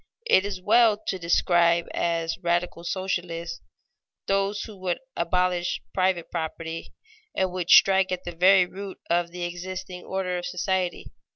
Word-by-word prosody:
It 195 - +4
is 195 -2 -5
well 220 +2 +4
to 195 -3 -4
describe 170 0 +3
as 165 -1 -1
radical 175 -1 -1
socialists 170 -2 -3 0.6
those 195 +1 0
who 215 - -9
would 185 -2 -2 0.2
abolish 175 +1 0
private 185 -2 0
property, 165 0 -5 0.4
and 190 -1 +1
would 180 -1 -4
strike 190 -1 +6
at 185 0 -3
the 175 - -7
very 185 +2 +6
root 195 +1 -8
of 170 0 +2
the 175 +1 -6
existing 180 +1 -6
order 185 -2 -2
of 175 - -5
society. 180 0 -2
180 Hz, 145 wpm, -25 LUFS, 170-190 Hz, 0.6 s, strike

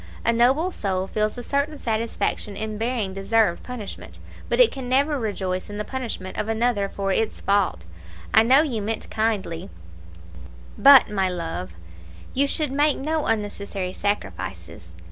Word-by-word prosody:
A 235 - +3
noble 265 +10 +3
soul 190 - -1
feels 215 +3 -1
a 245 - -5
certain 285 +4 -1
satisfaction 220 -3 -2
in 215 -1 -4
bearing 225 -4 -1
deserved 195 -1 +1
punishment, 245 -5 -8 0.3
but - - 0
it - - +7
can 260 -2 -6
never 280 +3 +2
rejoice 190 -5 -3
in 205 - -6
the 210 - -3
punishment 230 -8 -5
of 215 +1 -2
another 220 -3 +1
for 195 0 -2
its 220 +3 0
fault. 195 - +1 0.5
I 220 - +8
know 260 +6 +5
you 245 -9 -2
meant 220 +2 -4
kindly; 210 - -1 1.1
but, 275 -5 +7
my 195 -2 +1
love, 165 - -4 0.6
you 280 +2 +2
should 300 0 -1
make 290 +2 +2
no 310 +2 -1
unnecessary 200 -3 -2
sacrifices. 95 - -4
220 Hz, 150 wpm, -24 LUFS, 195-255 Hz, 1.1 s, I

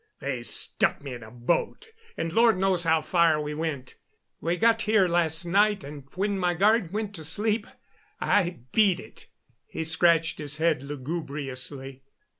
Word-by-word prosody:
They 140 -5 -3
stuck 120 - 0
me 140 -3 -6
in 120 - -8
a 110 - -11
boat, 125 - -2 0.3
and 165 - -3
Lord 230 -1 +4
knows 185 -2 +1
how 160 -1 +3
far 170 -3 +3
we 150 0 -4
went. 150 -5 -4 0.4
We 170 +3 -1
got 225 +4 +3
here 215 -3 +3
last 170 -1 +1
night, 205 +1 +2
and 140 -1 -9
when 200 +1 -1
my 175 -1 +1
guard 205 0 +3
went 210 0 -3
to 160 -5 -8
sleep 210 +7 0 0.5
I 175 -7 +1
beat 195 -2 +3
it." - - -14 0.4
He 160 - -4
scratched 165 0 +2
his 150 0 -1
head 160 -3 +1
lugubriously. 140 -2 -4
165 Hz, 160 wpm, -26 LUFS, 145-195 Hz, 0.5 s, Lord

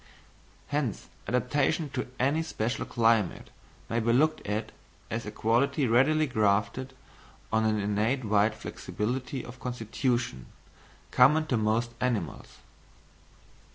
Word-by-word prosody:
Hence 145 -8 -2 0.2
adaptation 135 +6 +1
to 125 - -3
any 140 +5 +2
special 120 -6 -2
climate 115 -5 +1 0.4
may 115 - 0
be 115 +1 +1
looked 155 +6 +2
at 105 +2 -2 0.4
as 115 -1 -3
a - - -4
quality 130 +7 +1
readily 135 +7 +4
grafted 110 +3 0 0.6
on 110 0 +3
an 110 -1 +2
innate 105 +6 0
wide 105 +1 +3
flexibility 125 +5 -4
of 125 +1 -11
constitution, 120 - -2 0.6
common 150 +5 +5
to 140 - 0
most 110 +2 +1
animals. 110 - -2
120 Hz, 115 wpm, -28 LUFS, 110-135 Hz, 0.6 s, common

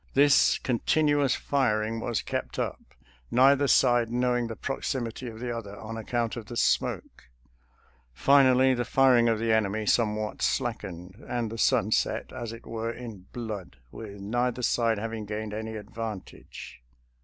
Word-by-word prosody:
This 145 +1 +5
continuous 145 +2 +1
firing 115 -5 0
was 115 -1 -2
kept - - -4
up, - - -3 0.5
neither 140 +3 +4
side 120 -3 +4
knowing 120 0 0
the 115 - -6
proximity 125 -2 -4
of 110 -1 -8
the 120 0 -3
other 105 -3 -7
on 110 +2 -7
account 115 +1 -2
of 115 -3 -7
the 120 - -6
smoke. - - 0 0.9
Finally 130 - +5
the 120 -1 -1
fir 135 +1 +4
ing 120 -1 +4
of 115 - +2
the 115 0 +1
enemy 110 0 0
somewhat 105 -1 0
slackened, 90 +5 -3
and 120 -3 -2
the 115 - -6
sun - - +2
set, - - 0
as 120 -3 -5
it 115 0 -11
were, 115 0 -4
in 115 -6 -9
blood, 105 - -6
with 100 -2 -9
neither 120 +5 -1
side 115 -1 +2
having 110 +1 -4
gained 105 0 -4
any 110 +1 -5
advantage. 105 - -8
115 Hz, 155 wpm, -27 LUFS, 110-125 Hz, 0.9 s, This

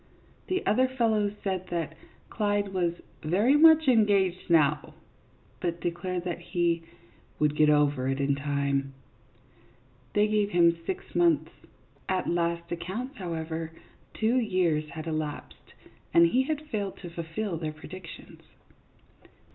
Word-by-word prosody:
The 370 0 -1
other 255 +5 +3
fellows 220 -5 +1
said 185 -2 -2
that 170 -3 -3 0.4
Clyde 205 -2 0
was 175 -2 0 0.2
" - - -32
very 205 - +3
much 320 0 +7
engaged 200 -7 +3
now," 150 -3 +2 0.6
but 170 -1 -2
declared 175 +1 -3
that 175 -1 -3
he 170 -1 0 0.3
" - - -32
would 150 -1 +2
get 150 0 +4
over 145 -3 +2
it 135 +1 -1
in 140 0 +2
time; 140 -1 -1 0.6
" 120 +2 -32
they 210 0 +4
gave 210 -1 +1
him 170 -3 +4
six 380 0 -5
months. 345 -1 +2 0.6
At 185 -1 0
last 170 0 -1
accounts, 220 - -5
however, 165 -2 -4 0.4
two 225 +3 +2
years 175 -9 0
had 155 +1 -7
elapsed, 155 -2 -5 0.4
and 170 - +8
he 245 +10 +3
had 310 +1 -3
failed 205 -5 -3
to 175 - -7
fulfil 170 +3 -4
their 155 -1 -3
predictions. 165 +3 -11
175 Hz, 140 wpm, -28 LUFS, 155-210 Hz, 0.6 s, and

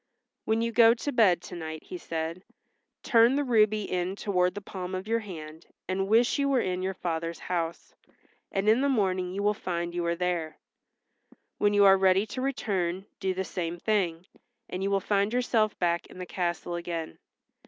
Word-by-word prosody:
"When 220 +1 +1
you 230 - -1
go 230 0 +6
to 285 +5 -3
bed 200 -9 +4
to 180 - -8
night," 160 -2 -6
he 360 - -8
said, 165 - -4 0.6
"turn 235 +1 +5
the 290 - +1
ruby 215 -4 +3
in 180 0 -2
toward 180 -3 0
the - - -3
palm 185 -1 -6
of 185 +2 -5
your 230 +1 +1
hand 160 -6 -9 0.2
and 190 +1 -1
wish 230 +6 +3
you 280 0 +2
were 270 -2 +3
in 185 -4 -1
your 190 +1 -2
father's 165 -1 -3
house, 170 -2 -4 0.6
and 195 +1 -1
in 225 +4 +5
the 280 - +2
morning 185 -7 +1
you 200 +2 -3
will 210 0 +3
find 175 -4 -3
you 175 0 -2
are 170 - +1
there. 175 -3 -2 1.0
When 205 0 +3
you 205 0 +6
are 195 0 +7
ready 190 +1 +4
to 255 +4 -5
return 195 -9 -1
do 190 -2 -1
the 190 - -1
same 175 -2 -4
thing, 180 -4 0 0.4
and 180 - -5
you 195 - 0
will 200 0 +2
find 200 +2 +1
yourself 230 -4 +1
back 170 -1 0
in - - -14
the 180 - -5
castle 175 -1 -3
again. 170 -2 -5
190 Hz, 195 wpm, -28 LUFS, 175-215 Hz, 1.0 s, are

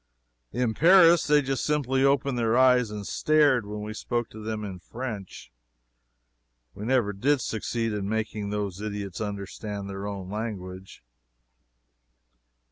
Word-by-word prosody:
In 120 -2 0
Paris 170 - +6
they 150 -1 +4
just 135 0 -2
simply 135 -3 +1
opened 140 -1 +2
their 115 0 +1
eyes 125 -3 +5
and 105 -1 -6
stared 145 -7 +3
when 105 0 -5
we 105 0 -5
spoke 120 +1 -3
to 110 - -10
them 110 -1 -3
in 95 -3 -7
French! 110 - -7 1.2
We 105 - -7
never 120 -4 +2
did 135 +8 +2
succeed 115 0 -2
in 100 -1 -3
making 110 -1 -2
those 100 -2 -3
idiots 100 -3 -5
understand 100 0 -5
their 100 +1 -5
own 100 -2 -5
language. 95 - -6
110 Hz, 135 wpm, -26 LUFS, 100-130 Hz, 1.2 s, Paris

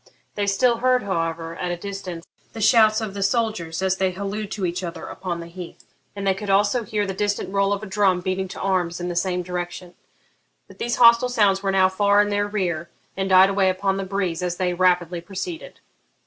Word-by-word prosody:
They 205 -1 -2
still 235 +4 +2
heard, 255 0 +2
however, 165 -3 -3
at 180 - -3
a 175 - -2
distance 185 -3 -7 0.3
the 225 - -7
shouts 220 0 +5
of 215 -3 -4
the 200 - -5
soldiers 195 -6 -1
as 190 0 +1
they 190 0 +1
hallooed 200 +2 -4
to 200 -3 -2
each 175 +1 -3
other 170 -1 -6
upon 175 -2 -5
the - - -8
heath, 175 +1 -10 0.3
and 200 -1 -5
they 195 - +3
could 200 +2 -7
also 205 +5 +3
hear 210 -1 -1
the 195 - -3
distant 205 0 -2
roll 200 0 +2
of 205 +1 -2
a - - -4
drum 190 -2 +2
beating 185 +1 -2
to 190 - -9
arms 180 -3 -1
in 175 0 -3
the 175 - -4
same 180 +1 0
direction. 175 0 -6 0.7
But - - -17
these 240 0 -1
hostile 235 +1 +6
sounds 205 -5 +2
were 195 -1 0
now 190 -1 +4
far 200 +2 +2
in 205 0 +3
their 205 0 0
rear, 175 -5 -2 0.3
and 190 0 -2
died 190 +1 +6
away 195 -1 +2
upon 195 +1 0
the 195 - -2
breeze 185 -3 -2
as 175 -1 -2
they 180 -1 0
rapidly 175 -1 +1
proceeded. 205 - -7
195 Hz, 220 wpm, -23 LUFS, 180-205 Hz, 0.7 s, hostile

